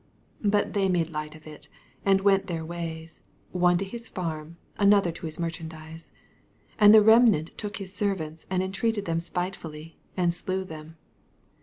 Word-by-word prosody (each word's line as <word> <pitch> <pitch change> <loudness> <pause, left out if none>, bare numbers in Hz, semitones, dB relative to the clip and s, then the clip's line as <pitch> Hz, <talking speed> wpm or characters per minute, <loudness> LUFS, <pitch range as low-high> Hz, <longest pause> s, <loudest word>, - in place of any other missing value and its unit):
6 205 - +2
But 205 0 +1
they 195 -2 +2
made 170 -2 +1
light 150 0 -5
of 155 - -15
U, 155 -1 -10 0.4
and 195 -1 +3
went 195 -1 +3
their 165 -3 -3
ways, 165 -1 -6 0.3
one 175 -1 +3
to 195 - -2
his 235 +4 -8
farm, 165 -3 -5 0.2
an 205 0 +6
other 195 -4 +2
to 165 - -9
his 155 +2 -7
merchandise: 165 -1 -6
6 - - -21 0.7
And 210 -1 +9
the 215 -1 +8
remnant 220 -7 +5
took 210 -2 -5
his 195 -2 -8
ser 200 -1 0
vants, 160 -2 -8
and 185 0 0
entreated 205 +2 -1
them 165 -1 0
spitefully, 165 -3 -6 0.2
and 175 -2 +2
slew 185 +2 -2
them. 160 -2 -10
175 Hz, 180 wpm, -27 LUFS, 160-195 Hz, 0.7 s, And